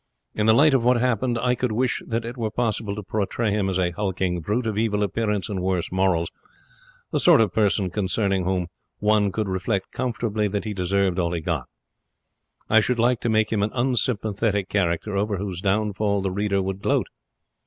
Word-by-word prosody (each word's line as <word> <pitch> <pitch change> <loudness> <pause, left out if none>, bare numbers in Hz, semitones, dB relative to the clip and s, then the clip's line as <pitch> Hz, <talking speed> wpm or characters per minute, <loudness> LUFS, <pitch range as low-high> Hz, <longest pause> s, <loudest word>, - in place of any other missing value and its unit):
In 105 0 0
the 110 - +6
light 150 +3 +5
of 130 -3 +3
what 125 +1 +4
happened, 120 0 +1
I 125 +2 +1
could 125 -1 -1
wish 120 +3 0
that 115 0 -2
it 120 +1 -6
were 115 -3 -2
possible 110 -2 -1
to 105 - -6
portray 105 +2 -1
him 100 -1 0
as 95 - -1
a 90 -1 +1
hulking 95 -1 -2
brute 110 +8 -1
of 110 -2 -1
evil 105 -1 +1
appearance 105 0 -1
and 100 -4 -3
worse 90 -2 -1
morals 90 -3 +1 0.8
the - - +1
sort 170 -4 +6
of 110 -5 +2
person 100 -3 +1
concerning 95 -1 0
whom 90 0 0 0.3
one 105 -1 +2
could 110 +1 -2
reflect 95 +1 -2
comfortably 115 -4 -1
that 100 +1 -3
he 105 - -3
deserved 95 0 0
all 85 -1 0
he 85 - -1
got. 80 -6 -2 1.0
I 110 - +5
should 120 +3 0
like 120 0 +2
to 120 - -1
make 110 0 +2
him 105 - +1
an 105 - +1
unsympathetic 110 -5 0
character, 100 +1 0
over 100 0 0
whose 95 -2 -4
downfall 100 0 0
the 95 -1 -1
reader 100 0 0
would 95 +1 -4
gloat. - - +1
105 Hz, 195 wpm, -24 LUFS, 95-115 Hz, 1.0 s, the